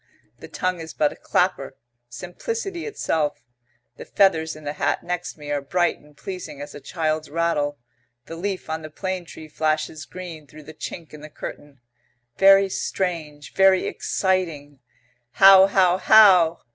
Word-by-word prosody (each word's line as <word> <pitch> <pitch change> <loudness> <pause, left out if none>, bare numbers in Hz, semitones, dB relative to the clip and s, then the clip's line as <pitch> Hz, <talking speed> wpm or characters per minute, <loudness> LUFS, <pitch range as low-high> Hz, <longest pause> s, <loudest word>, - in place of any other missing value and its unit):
The - - -10
tongue 185 -1 -2
is 160 -1 -9
but 150 -1 +2
a - - -16
clapper. 180 -7 -1 0.3
Simplicity 350 - -5
itself. 155 - -2 0.5
The - - -9
feathers 160 -5 +2
in 155 - -13
the 145 0 -4
hat - - -1
next 180 -1 -4
me 145 -1 -8
are 145 -1 -1
bright 175 +5 0
and 150 0 -22
pleasing 185 -7 -8
as 145 - -8
a - - -9
child's 155 -1 -2
rattle. 150 -2 -1 0.5
The 165 - -8
leaf 190 +2 -4
on 160 0 -4
the 155 - -9
plane 185 +2 -4
tree 160 -1 -11
flashes 155 0 -2
green 165 -3 -9
through 155 +2 -14
the 155 - -12
chink 160 +1 -8
in 150 - -11
the 155 - -10
curtain. 145 -2 -10 0.6
Very 195 0 +6
strange, 165 -6 -4
very 190 -1 +4
exciting. 165 -7 -2 0.5
"How 195 0 +8
how 185 -2 +3
how!" 185 -7 +6
165 Hz, 160 wpm, -23 LUFS, 150-185 Hz, 0.6 s, How